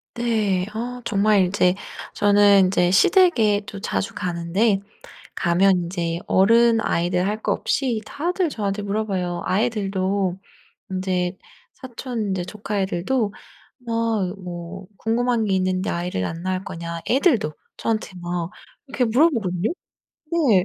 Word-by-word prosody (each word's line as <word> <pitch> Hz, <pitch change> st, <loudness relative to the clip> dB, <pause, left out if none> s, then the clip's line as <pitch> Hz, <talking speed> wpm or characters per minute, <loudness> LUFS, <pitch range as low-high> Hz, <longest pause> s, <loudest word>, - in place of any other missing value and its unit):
네. 215 Hz, -6 st, 0 dB
아 245 Hz, +3 st, -4 dB
정말 205 Hz, -2 st, +3 dB
인제 180 Hz, 0 st, +2 dB, 0.4 s
저는 205 Hz, -1 st, +5 dB
인제 180 Hz, -1 st, +2 dB
시댁에 220 Hz, -, +4 dB
또 200 Hz, -, -7 dB
자주 205 Hz, +1 st, -2 dB
가는데 185 Hz, +4 st, 0 dB, 0.6 s
가면 190 Hz, +3 st, +3 dB
인제 170 Hz, -1 st, -2 dB
어른 230 Hz, +4 st, +5 dB
아이들 180 Hz, -1 st, 0 dB
할 210 Hz, +2 st, -2 dB
것 -, -, +1 dB
없이 250 Hz, -5 st, 0 dB
다들 350 Hz, +3 st, -1 dB
저한테 205 Hz, -6 st, -3 dB
물어봐요. 195 Hz, -4 st, -2 dB
아이들도 195 Hz, -3 st, 0 dB, 0.5 s
인제 185 Hz, -1 st, -1 dB, 0.4 s
사촌 245 Hz, -3 st, -5 dB
인제 190 Hz, -2 st, -1 dB
조카 205 Hz, +2 st, -4 dB
애들도 200 Hz, +4 st, 0 dB, 0.5 s
막 225 Hz, -5 st, 0 dB
뭐 180 Hz, +1 st, -7 dB
"궁금한 235 Hz, 0 st, +1 dB
게 195 Hz, -, +1 dB
있는데 185 Hz, 0 st, 0 dB
아이를 170 Hz, -, -2 dB
안 165 Hz, -, -5 dB
낳을 185 Hz, 0 st, -2 dB
거냐." 170 Hz, 0 st, -6 dB
애들도 250 Hz, -, +3 dB, 0.3 s
저한테 220 Hz, -3 st, -2 dB
막 175 Hz, -1 st, -3 dB, 0.4 s
이렇게 265 Hz, -2 st, 0 dB
물어보거든요. 225 Hz, -, +2 dB, 0.6 s
네. 255 Hz, -, +3 dB
200 Hz, 260 characters per minute, -22 LUFS, 180-230 Hz, 0.6 s, 저는